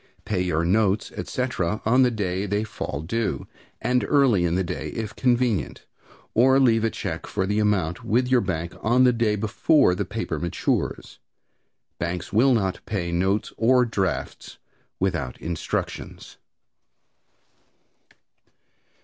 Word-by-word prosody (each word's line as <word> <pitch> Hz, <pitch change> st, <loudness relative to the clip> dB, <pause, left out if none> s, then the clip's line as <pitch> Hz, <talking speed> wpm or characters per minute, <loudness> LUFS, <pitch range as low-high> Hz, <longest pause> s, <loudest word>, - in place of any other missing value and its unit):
Pay 95 Hz, -4 st, -1 dB
your 85 Hz, -2 st, 0 dB
notes, 100 Hz, +2 st, +1 dB
etc., 110 Hz, -6 st, -2 dB
on 125 Hz, +4 st, +4 dB
the 125 Hz, -, +5 dB
day 100 Hz, -3 st, -2 dB
they 100 Hz, +2 st, 0 dB
fall 75 Hz, -8 st, -5 dB
due, 115 Hz, +6 st, -2 dB, 0.3 s
and 125 Hz, 0 st, +1 dB
early 130 Hz, -11 st, +3 dB
in 85 Hz, 0 st, 0 dB
the 95 Hz, -, +1 dB
day 85 Hz, -, -4 dB
if 110 Hz, -1 st, -4 dB
convenient, 120 Hz, -4 st, 0 dB, 0.5 s
or 130 Hz, +3 st, +5 dB
leave 115 Hz, -4 st, +4 dB
a 115 Hz, -, +2 dB
check -, -, -5 dB
for 95 Hz, -, -1 dB
the 105 Hz, +2 st, 0 dB
amount 95 Hz, -5 st, 0 dB
with 125 Hz, +3 st, +1 dB
your 130 Hz, -1 st, +3 dB
bank 85 Hz, -4 st, -3 dB
on 120 Hz, +3 st, +3 dB
the 125 Hz, -1 st, +5 dB
day 115 Hz, -2 st, +1 dB
before 110 Hz, -, +3 dB
your 90 Hz, -, -1 dB
paper -, -, -4 dB
matures. 85 Hz, -1 st, -2 dB, 0.8 s
Banks 85 Hz, +2 st, -4 dB
will 125 Hz, +4 st, +5 dB
not 95 Hz, -4 st, -1 dB
pay 90 Hz, -5 st, -2 dB
notes 95 Hz, +4 st, 0 dB
or 125 Hz, +2 st, +4 dB
drafts 95 Hz, -6 st, -3 dB, 0.4 s
without 85 Hz, -10 st, -1 dB
instructions. 85 Hz, -1 st, -5 dB
105 Hz, 135 wpm, -24 LUFS, 90-120 Hz, 0.8 s, the